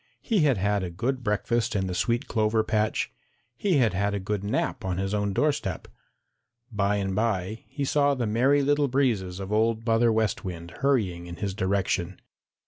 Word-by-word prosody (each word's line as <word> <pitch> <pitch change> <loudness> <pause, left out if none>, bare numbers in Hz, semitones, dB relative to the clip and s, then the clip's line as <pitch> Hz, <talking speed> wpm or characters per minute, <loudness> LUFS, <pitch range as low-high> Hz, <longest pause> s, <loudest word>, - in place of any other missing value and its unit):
He 225 -5 +1
had 145 -7 +3
had 100 +1 +1
a 90 - -3
good 125 +9 -2
breakfast 115 +2 0
in 95 -1 +1
the 90 - -3
sweet 120 +8 0
clover 110 0 +1
patch. 110 0 0 0.4
He 195 - 0
had 115 -7 +3
had 100 +2 0
a - - -1
good 100 +1 -3
nap 100 - -1
on 95 -2 -2
his 95 +1 -2
own 100 -1 0
doorstep. 145 - -1 0.8
By 105 -1 +1
and 95 -1 -1
by 110 -1 -1
he 145 -2 -3
saw 145 0 +2
the 125 -3 -1
Merry 130 +7 +3
Little 145 +1 +2
Breezes 115 -9 0
of 100 +1 -4
old 110 +1 +1
Mother 115 0 +3
West 110 -1 0
Wind 85 -2 -6
hurrying 100 -11 +1
in 85 - -7
his 100 +1 -3
direction. 95 -2 -1
105 Hz, 185 wpm, -26 LUFS, 95-120 Hz, 0.8 s, had